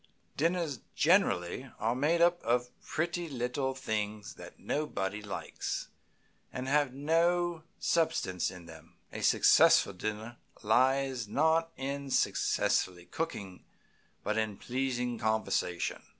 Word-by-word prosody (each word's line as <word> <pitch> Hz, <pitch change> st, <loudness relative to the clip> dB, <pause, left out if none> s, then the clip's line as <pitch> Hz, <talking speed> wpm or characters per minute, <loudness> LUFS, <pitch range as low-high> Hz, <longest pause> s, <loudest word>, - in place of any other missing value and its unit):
Dinners 165 Hz, -2 st, 0 dB, 0.2 s
generally 135 Hz, -, +2 dB
are 115 Hz, +2 st, 0 dB
made 150 Hz, +7 st, +1 dB
up 175 Hz, 0 st, +4 dB
of 125 Hz, +1 st, 0 dB
pretty 170 Hz, +1 st, -2 dB
little 130 Hz, +1 st, -2 dB
things 105 Hz, -4 st, -3 dB
that -, -, -12 dB
nobody 105 Hz, -9 st, -2 dB
likes, 105 Hz, -2 st, -5 dB, 0.6 s
and 130 Hz, +1 st, -5 dB
have 145 Hz, -1 st, +2 dB
no 165 Hz, +4 st, +1 dB, 0.2 s
sustenance 95 Hz, -, 0 dB
in 90 Hz, -2 st, -11 dB
them. 80 Hz, -1 st, -14 dB, 0.2 s
A -, -, -5 dB
successful 100 Hz, -, +5 dB
dinner 110 Hz, +5 st, -5 dB, 0.3 s
lies 130 Hz, +2 st, +2 dB
not 160 Hz, +7 st, +2 dB
in 140 Hz, +1 st, -4 dB
successful 95 Hz, -7 st, +1 dB
cooking, 100 Hz, -, -4 dB, 0.6 s
but 105 Hz, +1 st, 0 dB
in 110 Hz, -2 st, -2 dB
pleasing 125 Hz, -2 st, -2 dB
conversation. 110 Hz, -5 st, -1 dB
130 Hz, 110 wpm, -31 LUFS, 105-155 Hz, 0.6 s, successful